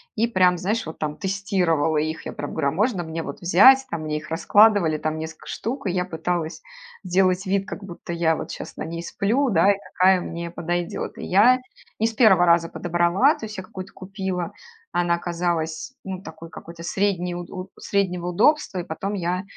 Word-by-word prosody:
и 225 +2 +2
прям, 185 -5 +3
знаешь, 215 +5 -1
вот 160 - -8
там 150 -1 -3
тестировала 185 -6 0
их. 155 +1 -2
Я - - -5
прям - - -6
говорю: 145 -3 0
"А - - -3
можно 200 0 0
мне 160 0 -4
вот 140 - -7
взять?" 260 +10 +6
Там 165 -2 -4
мне 150 0 -2
их 155 - -9
раскладывали, 195 -1 +4
там 155 +1 -2
несколько 160 0 -8
штук, 255 +4 -4
и - - +1
я 180 0 0
пыталась 170 -1 -3 0.4
сделать 185 +1 +2
вид, 195 +1 0
как 205 - -7
будто 175 -2 -8
я 165 -1 +2
вот - - -6
щас - - -8
на - - -4
ней 165 +1 -5
сплю, 240 +10 0
да, 195 0 +4
и 200 - 0 0.2
какая 185 0 +4
мне 170 0 -5
подойдёт. 175 0 -3
И - - -6
я 240 +7 +5 0.4
не 225 - +3
с 225 - -4
первого 195 -7 +5
раза 170 0 +4
подобрала. 175 - +2
То 220 - -7
есть 210 -1 -8
я 190 - -5
какую-то 185 0 -9
купила, 190 -2 -4 0.4
она 175 -1 +1
оказалась, 170 +2 -2
ну, 190 -1 -6
такой 165 -3 -10
какой-то 170 +1 -10
средней 180 -2 0
уд 175 0 -7
у 185 +1 -7
среднего 180 -3 -1
удобства, 205 - +2
и 175 - -3
потом 195 +6 -4
я 180 +1 -2
180 Hz, 200 wpm, -23 LUFS, 170-195 Hz, 0.4 s, взять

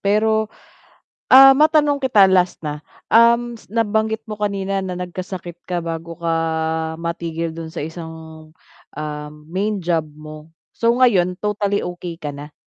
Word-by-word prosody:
pero, 215 +2 +1 0.8
ah, 270 +1 +10
matanong 300 -1 +3
kita 215 -8 +5
last 180 -1 +2
na. 150 -1 -6 0.2
Um, 235 +1 +4
s - - -19
nabanggit 220 0 0
mo 215 - -5
kanina 195 -2 -2
na 185 -1 -4
nagkasakit 180 -1 -7
ka 175 -1 -2
bago 165 0 -5
ka 165 -1 -1 0.7
matigil 170 -1 -3
do'n 165 -1 -7
sa - - -5
isang, 160 0 -9 0.4
ah, 150 0 -6 0.2
main 200 +4 -2
job 165 -2 0
mo, 155 +1 -12 0.2
so 230 0 +3
ngayon 200 -8 +3
totally 205 -1 -1
okey 175 -1 -6
ka 150 - -4
na? 145 +1 -10
180 Hz, 140 wpm, -20 LUFS, 165-220 Hz, 0.8 s, ah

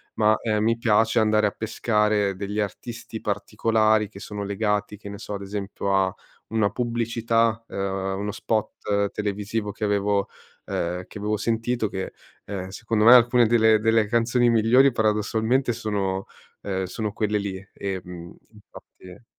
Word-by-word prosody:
ma, 110 0 +4
ehm, 105 -2 0
mi 115 +1 +2
piace 115 +1 +3
andare 110 -1 +3
a - - -2
pescare 105 -2 0
degli 100 +2 -4
artisti 110 +2 -5
particolari 110 +1 +1
che 100 - -12
sono 105 -1 -6
legati, 105 +1 -1
che 100 - -11
ne 100 - -7
so, 105 - -5
ad 100 - -6
esempio, 100 0 -3
a 95 -1 +2 0.4
una 110 -3 +1
pubblicità, 115 0 0
ehm, 95 0 -2
uno 105 +1 -2
spot 105 -2 -1
televisivo 105 +1 -3
che 105 - -8
avevo 100 -1 +1 0.4
ehm, 90 +1 -2
che 105 - -9
avevo 105 +1 -1
sentito, 115 +1 -1
che, 95 -1 -5 0.3
ehm, 95 -2 -5
secondo 110 +2 -1
me 120 - +10
alcune 120 0 +6
delle 110 -1 +5
delle 110 0 +3
canzoni 120 +2 +2
migliori 115 +4 +5
paradossalmente 110 +3 +1
sono, 100 -4 -2 0.4
ehm, 95 -1 -2
sono 105 +3 -4
quelle 105 0 0
lì, 100 -2 -3 0.2
ehm, 90 -3 -6 0.2
infatti 105 -1 -15
105 Hz, 150 wpm, -24 LUFS, 100-115 Hz, 0.4 s, me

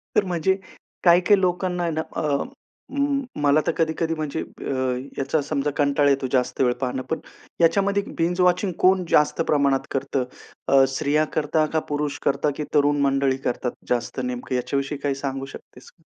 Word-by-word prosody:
तर 210 - +4
म्हणजे, 180 +1 +1 0.5
काही-काही 180 +3 +5
लोकांना 180 0 0
आहे 170 - 0
ना, 160 0 -1
अ, - - -1 0.7
अं, 280 0 0 0.2
मला 145 +1 +4
तर - - +4
कधी-कधी 165 0 0
म्हणजे 155 0 -3
ब्य, - - -8 0.5
याचा 140 +3 0
समजा 145 0 -1
कंटाळा 145 0 +3
येतो 135 -1 +1
जास्त 130 0 0
वेळ 125 -1 +3
पाहणं. 130 0 -1
पण 160 - -1 0.4
याच्यामध्ये 200 +4 +3
बिंज 175 +2 +1
वॉचिंगमध्ये 180 0 +2
कोण 185 0 +4
जास्त 150 +2 +3
प्रमाणात 140 -1 +2
करतं? 135 -1 -1 0.4
अ, 135 -1 +6
स्त्रिया 150 +1 +2
करता? 155 0 +2
का 160 - +3
पुरुष 145 0 -2
करता? 145 +2 +2
की 150 - -2
तरुण 145 0 +3
मंडळी 135 -1 +2
करतात 125 0 -1 0.2
जास्त, 120 +1 -1
नेमकं 125 +1 -3
याच्याविषयी 135 +3 -2
काही 140 -1 -1
सांगू 135 -1 -4
शकतेस - - -13
का? - - -33
150 Hz, 165 wpm, -23 LUFS, 135-170 Hz, 0.7 s, अ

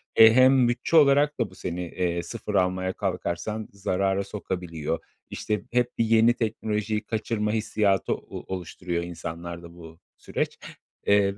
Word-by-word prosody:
E, 110 0 +9
hem 130 0 +6
bütçe 120 +7 -1
olarak 145 0 +5
da 115 -4 0
bu 95 - -16
seni, 90 -1 -4
eee, 85 0 -2
sıfıf 105 -1 -5
almaya 95 0 +1
kalkarsan 105 +7 -3
zarara 95 0 0
sokabiliyor. 90 -6 -4 0.3
İşte 105 -1 -2
hep 120 0 0
bir 115 - +2
yeni 115 +1 +5
teknolojiyi 110 -1 -2
kaçırma 105 -1 -1
hissiyatı 105 -3 +1
o 95 - -6
oluşturuyor 85 -1 -4
insanlarda 85 0 -7
bu 80 -1 -13 0.2
süreç, - - -3 0.5
eee, 100 -1 +3
100 Hz, 135 wpm, -26 LUFS, 90-110 Hz, 0.5 s, E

